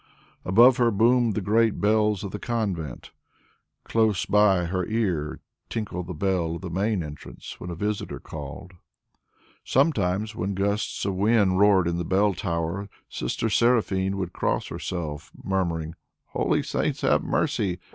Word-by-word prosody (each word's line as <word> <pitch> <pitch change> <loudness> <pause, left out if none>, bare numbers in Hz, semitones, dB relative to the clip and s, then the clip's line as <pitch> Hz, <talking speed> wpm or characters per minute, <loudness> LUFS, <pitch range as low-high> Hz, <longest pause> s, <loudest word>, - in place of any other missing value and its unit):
Above 120 +7 +6
her 120 -1 +4
boomed 115 +1 +3
the 105 - -1
great 110 +2 +2
bells 105 -1 +2
of 100 - -5
the 105 - -5
convent, 95 - -3 0.7
close 110 -4 +1
by 100 -4 +4
her 90 +2 -1
ear 95 -10 -1 0.3
tinkled 95 -5 -4
the 90 - -4
bell 85 -2 0
of - - -7
the 90 - -5
main 100 +1 0
entrance 75 -1 -9
when 90 - -7
a 85 - -4
visitor 105 +4 -3
called. 80 +5 -8 0.9
Sometimes, 110 - +1
when 95 +2 -2
gusts 100 +2 -1
of 100 - 0
wind 100 -1 +3
roared 100 -4 +5
in 85 0 -1
the - - -1
bell 100 +4 +2
tower, 85 +3 -3 0.2
Sister 60 - -2
Seraphine 100 -4 +2
would 90 -2 -4
cross - - -1
herself, 75 -4 -5
murmuring, 85 -4 -1 0.4
"Holy - - 0
saints - - -1
have - - +3
mercy! 90 -3 0
95 Hz, 145 wpm, -25 LUFS, 90-105 Hz, 0.9 s, Above